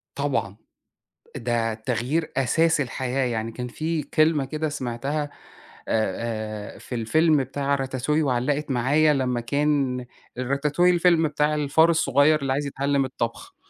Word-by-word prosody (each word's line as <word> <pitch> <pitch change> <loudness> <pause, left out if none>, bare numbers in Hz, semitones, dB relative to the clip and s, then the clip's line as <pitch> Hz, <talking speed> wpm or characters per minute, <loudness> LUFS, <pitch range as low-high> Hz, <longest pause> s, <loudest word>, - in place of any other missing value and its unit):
طبعًا. 135 -8 -2 0.8
ده 115 -1 -1
التغيير 125 +8 -2
أساس 160 +4 +2
الحياة، 130 +1 -1
يعني 115 -2 -2
كان 125 +2 -5
في 155 +4 -2
كلمة 155 -1 +2
كده 155 +3 -3
سمعتها 145 +2 -3 0.6
آآ 110 0 -2
آآ - - -13
في 125 - -7
الفيلم 155 +7 +3
بتاع 140 +2 -1
راتاتوي 135 +3 -1
وعلَّقت 140 +2 0
معايا 145 +5 +3
لمّا 125 -3 0
كان 135 -1 0 0.3
راتاتوي 145 +7 +1
الفيلم 170 -2 +4
بتاع 150 0 0
الفار 150 +3 +3
الصغير 150 -1 +3
اللي 135 -1 0
عايز 145 +2 -1
يتعلِّم 140 0 0
الطبخ، 115 -2 -5
140 Hz, 130 wpm, -24 LUFS, 125-150 Hz, 0.8 s, الفيلم